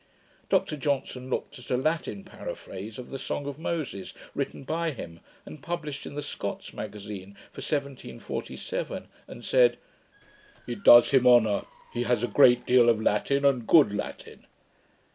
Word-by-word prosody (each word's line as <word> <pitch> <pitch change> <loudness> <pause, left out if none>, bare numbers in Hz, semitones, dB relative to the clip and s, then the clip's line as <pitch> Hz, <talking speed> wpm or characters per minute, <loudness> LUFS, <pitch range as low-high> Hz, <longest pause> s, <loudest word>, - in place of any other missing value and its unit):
Dr 150 - +1
Johnson 135 -2 -2
looked 125 - -3
at 125 - -13
a 125 - +2
Latin 135 -8 -1
paraphrase 100 +3 -8
of 125 - -9
the 135 - -5
song 145 - -4
of 145 +1 -6
Moses, 155 - -4 0.2
written - - -4
by 165 +4 -1
him, 85 - -8 0.3
and 150 - -10
published 155 -4 -5
in - - -9
the 145 - -3
Scots 145 - -5
Magazine 100 -2 -7 0.2
for - - -9
1747, 150 - -4 0.2
and - - -10
said, - - +4 0.9
'It 200 - -6
does 120 0 +8
him 130 -2 +4
honour; 110 -4 +5 0.3
he 120 - -2
has 120 -1 +1
a - - +2
great 125 -2 +5
deal 125 -1 +5
of 115 -2 +3
Latin, 140 +6 +1
and 130 -5 +2
good 145 -11 +6
Latin.' 105 - -7
130 Hz, 155 wpm, -27 LUFS, 110-145 Hz, 0.9 s, does